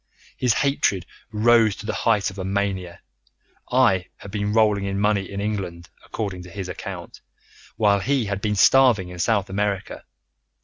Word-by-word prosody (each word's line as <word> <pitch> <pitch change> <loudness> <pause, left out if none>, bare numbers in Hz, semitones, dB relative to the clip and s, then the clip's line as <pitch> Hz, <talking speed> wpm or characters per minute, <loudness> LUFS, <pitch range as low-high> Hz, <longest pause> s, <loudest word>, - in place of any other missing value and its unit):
His 125 -2 +1
hatred 135 -10 +1 0.3
rose 110 -1 +4
to - - -10
the 110 - -2
height 105 -4 +1
of 100 - -11
a - - -3
mania. 95 -3 -3 0.7
I 115 -9 +3
had 100 - -11
been 105 0 -2
rolling 105 -2 +2
in 100 0 -2
money 100 -2 +1
in 100 - -5
England, 95 -5 -4
according 95 -4 -5
to 90 - -11
his 95 +1 -6
account, 90 - -8 0.5
while 100 -2 +3
he 130 +3 0
had 100 -1 -3
been 105 -1 0
starving 110 -2 +5
in 90 0 -9
South 100 0 +1
America. 100 0 -3
100 Hz, 165 wpm, -23 LUFS, 95-110 Hz, 0.7 s, starving